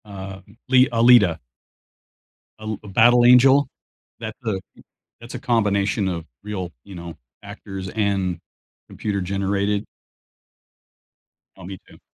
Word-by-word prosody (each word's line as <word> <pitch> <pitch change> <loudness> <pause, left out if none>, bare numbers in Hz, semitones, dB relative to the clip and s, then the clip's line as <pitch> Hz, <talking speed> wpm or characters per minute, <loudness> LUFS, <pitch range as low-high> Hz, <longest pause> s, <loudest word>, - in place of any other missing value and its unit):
Uh, 95 -2 -9 0.3
li 130 0 +5
Alita. 115 -7 +5 1.2
Uh, - - -12
l 110 -1 -4
a - - -11
battle 120 +5 +4
angel, 130 +3 +6 0.5
that's 110 -1 -7
a 105 -4 -1 0.6
that's 120 +2 -10
a - - -5
combination 105 -4 0
of 85 -3 -4 0.2
real, 95 -4 -5
you 100 - -12
know, 85 -1 -8 0.3
actors 95 -1 -8
and 95 -4 -1 0.5
computer 100 -2 -3
generated. 100 +2 -1 1.7
Oh, - - -13
me 95 +1 -8
too. - - -18
100 Hz, 120 wpm, -22 LUFS, 95-115 Hz, 1.7 s, angel